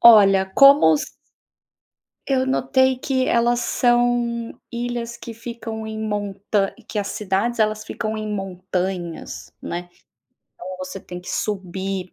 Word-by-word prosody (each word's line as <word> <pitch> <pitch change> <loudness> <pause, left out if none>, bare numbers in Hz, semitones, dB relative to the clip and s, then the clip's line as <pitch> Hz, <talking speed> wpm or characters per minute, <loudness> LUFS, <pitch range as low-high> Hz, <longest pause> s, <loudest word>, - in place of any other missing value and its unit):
Olha 195 -4 +7
como 275 - +7 1.3
eu 260 -1 +2
notei 260 0 +2
que 260 0 0
elas 240 +1 +3
são 240 -1 +1 0.2
ilhas, 235 0 -3
que 235 - -8
ficam 225 -1 -6
em 220 0 -5
montanhas, 205 -1 -1
que 215 - -3
as 200 - -1
cidades, 210 +4 -1
elas 215 0 +1
ficam 220 -1 -3
em 215 0 -4
montanhas, 185 -3 -4
né, 175 +1 -4 0.7
então, 185 +1 -7
você 185 +1 -6
tem 180 -1 -8
que 180 - -8
subir, 190 -1 -3
215 Hz, 125 wpm, -22 LUFS, 190-240 Hz, 1.3 s, Olha